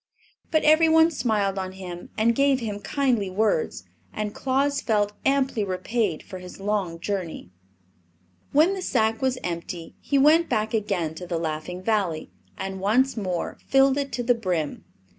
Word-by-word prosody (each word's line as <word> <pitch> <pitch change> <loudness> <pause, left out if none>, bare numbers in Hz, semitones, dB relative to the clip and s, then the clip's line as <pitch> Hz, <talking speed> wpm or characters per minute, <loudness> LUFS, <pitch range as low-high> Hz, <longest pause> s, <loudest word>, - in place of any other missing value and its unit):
But 315 -2 +2
every 315 +2 +5
one 320 +1 +5
smiled 210 -8 0
on 185 0 -4
him 180 -2 -8
and 225 +2 +3
gave 275 +1 +3
him 210 -4 -4
kindly 240 -3 0
words, 220 - 0 0.3
and 210 -1 -4
Claus 275 +2 0
felt 210 -2 +1
amply 270 -5 +1
repaid 195 -1 -1
for 185 -2 -8
his 180 +1 -11
long 195 -4 -1
journey. 175 - -4 1.0
When 315 +7 +4
the 385 - -4
sack 225 -8 +1
was 260 -1 +1
empty 170 0 -5
he 280 - 0
went 310 +5 +5
back 220 -2 0
again 195 -7 -1
to 180 +2 -8
the 170 -1 -1
Laughing 165 +3 -4
Valley 190 - -1 0.3
and 190 0 -4
once 250 +7 +2
more 185 -6 -3
filled 270 0 +5
it 280 -1 -2
to 245 0 -2
the 245 +1 +4
brim. 180 -10 -2
215 Hz, 160 wpm, -25 LUFS, 185-265 Hz, 1.0 s, every